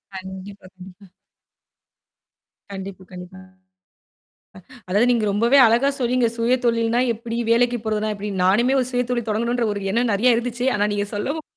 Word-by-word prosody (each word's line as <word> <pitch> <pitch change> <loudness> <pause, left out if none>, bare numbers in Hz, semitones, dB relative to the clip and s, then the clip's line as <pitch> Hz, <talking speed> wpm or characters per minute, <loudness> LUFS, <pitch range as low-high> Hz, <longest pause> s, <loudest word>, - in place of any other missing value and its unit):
கண்டிப்பா, 190 +1 -9
கண்டிப்பா. 185 +1 -14 1.7
கண்டிப்பா, 190 -1 -8
கண்டிப்பா. 180 +1 -10 1.5
அதாவது 210 +6 +2
நீங்க 230 -3 0
ரொம்பவே 235 +7 +3
அழகா 240 +5 +3
சொன்னீங்க. 245 -1 +1
சுயதொழில்னா 235 -1 +1
எப்படி, 230 +1 -6
வேலைக்கு 240 +1 +2
போறதுனா 215 0 -1
எப்படி. 205 +1 -5
நானுமே 235 +8 +3
ஒரு 250 - -1
சுயதொழில் 245 -2 -2
தொடங்கணுன்ற 235 +2 0
ஒரு 200 - -5
எண்ணம் 235 +1 +1
நெறைய 240 +4 +3
இருந்துச்சு. 245 +1 -3
ஆனா 205 0 +1
நீங்க 205 0 -2
சொல்லவும் 285 +10 -3
230 Hz, 130 wpm, -21 LUFS, 200-245 Hz, 1.7 s, ரொம்பவே